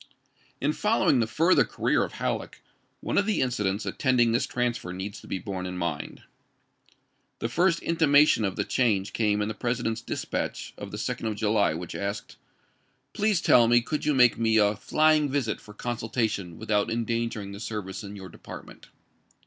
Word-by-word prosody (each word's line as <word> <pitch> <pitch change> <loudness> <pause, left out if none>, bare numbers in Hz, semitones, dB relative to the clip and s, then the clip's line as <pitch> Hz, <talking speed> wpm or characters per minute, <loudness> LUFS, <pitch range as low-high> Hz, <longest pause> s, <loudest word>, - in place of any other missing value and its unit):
In 145 +2 +1
following 210 - +2
the 115 - +1
further 165 +10 +4
career - - 0
of - - -5
Halleck, - - -4 0.4
one - - +1
of 200 - 0
the 215 - +1
incidents 105 -5 -1
attending 125 -4 +2
this 120 +3 +1
transfer 120 -7 -2
needs 95 +2 -6
to - - -14
be - - -2
borne 95 -1 -5
in 90 0 -5
mind. 85 -5 -4 1.1
The - - -2
first 170 +7 +2
intimation 150 -6 +4
of 95 -2 -1
the - - 0
change 105 -6 0
came 105 -2 +1
in - - -2
the 110 - -3
President's 115 0 -2
dispatch - - -4
of - - -8
the - - -6
2d 115 - -3
of 110 - -2
July 105 -5 +2
which 85 +1 -6
asked: 100 +1 -5 0.4
" - - -43
Please 210 -4 +1
tell 120 -2 +5
me 120 +1 +5
could 150 +6 -3
you 150 -1 +1
make 125 -3 +5
me 110 -1 +3
a 105 -1 +4
fljdug 155 +7 +2
visit 130 -6 -1
for 105 - -14
consultation 110 -6 -2
without 105 -1 0
endangering 115 -3 -2
the 100 - -8
service 105 -4 -5
in 100 0 -8
your 95 -2 -9
department - - -11
115 Hz, 180 wpm, -27 LUFS, 100-130 Hz, 1.1 s, tell